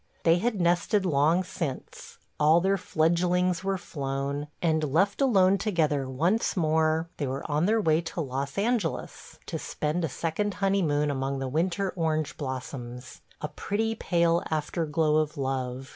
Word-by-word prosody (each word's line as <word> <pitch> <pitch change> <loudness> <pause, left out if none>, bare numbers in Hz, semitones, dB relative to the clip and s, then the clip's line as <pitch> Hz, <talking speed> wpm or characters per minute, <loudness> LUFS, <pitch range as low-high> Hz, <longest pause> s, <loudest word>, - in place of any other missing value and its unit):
They 165 +1 +4
had 220 0 -1
nested 175 +3 +2
long 160 +2 +3
since; 160 -6 -6 0.2
all 155 +3 +5
their 190 +3 +2
fledglings 175 +3 +1
were 195 0 0
flown, 140 -2 -3
and, 160 -2 +1
left 185 - +1
alone 195 -7 +4
together 155 -9 0
once 175 - 0
more, 160 0 +2
they 145 - -2
were 135 +2 -3
on 155 +3 +1
their 225 +2 +3
way 160 -5 +2
to 165 +1 -6
Los 135 +1 -4
Angeles 210 -4 -2
to - - -4
spend 155 +3 -2
a 165 - 0
second 170 +8 -2
honeymoon 175 -7 +1
among 135 0 -2
the 135 0 -3
winter 180 +7 0
orange 155 -3 -1
blossoms: 130 -2 -6 0.2
a - - -2
pretty 225 +3 -2
pale 170 -5 +1
afterglow 155 0 0
of 155 0 0
love. 130 -1 -3
160 Hz, 150 wpm, -27 LUFS, 145-185 Hz, 0.2 s, all